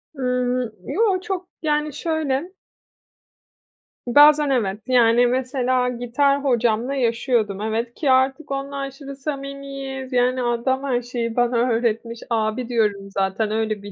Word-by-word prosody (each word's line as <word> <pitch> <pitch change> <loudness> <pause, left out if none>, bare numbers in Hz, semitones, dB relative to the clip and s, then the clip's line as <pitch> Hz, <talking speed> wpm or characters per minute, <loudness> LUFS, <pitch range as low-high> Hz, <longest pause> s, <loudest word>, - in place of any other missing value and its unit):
Iıı, 250 -2 -1
yo. 405 -3 +1
Çok, 375 -3 -4
yani, 300 -2 0
şöyle 315 +1 -2 1.5
bazen, 295 +3 +6
evet. 210 -7 0
Yani, 245 -1 +4
mesela 255 0 0
gitar 270 +4 +1
hocamla 240 0 +1
yaşıyordum, 230 -5 0
evet, 225 +2 -2
ki 285 -4 0
artık 265 +3 +2
onunla 275 0 -4
şimdi 275 0 -9
samimiyiz. 275 -2 -6
Yani, 250 +1 +2
adam 240 +3 0
her 255 -3 0
şeyi 235 -1 -4
bana 245 0 +2
öğretmiş. 230 0 -1
"Abi" 225 +1 -1
diyorum 210 -4 0
zaten. 195 +3 0
Öyle 215 -1 -1
bir. 205 - -8
250 Hz, 125 wpm, -22 LUFS, 230-275 Hz, 1.5 s, bazen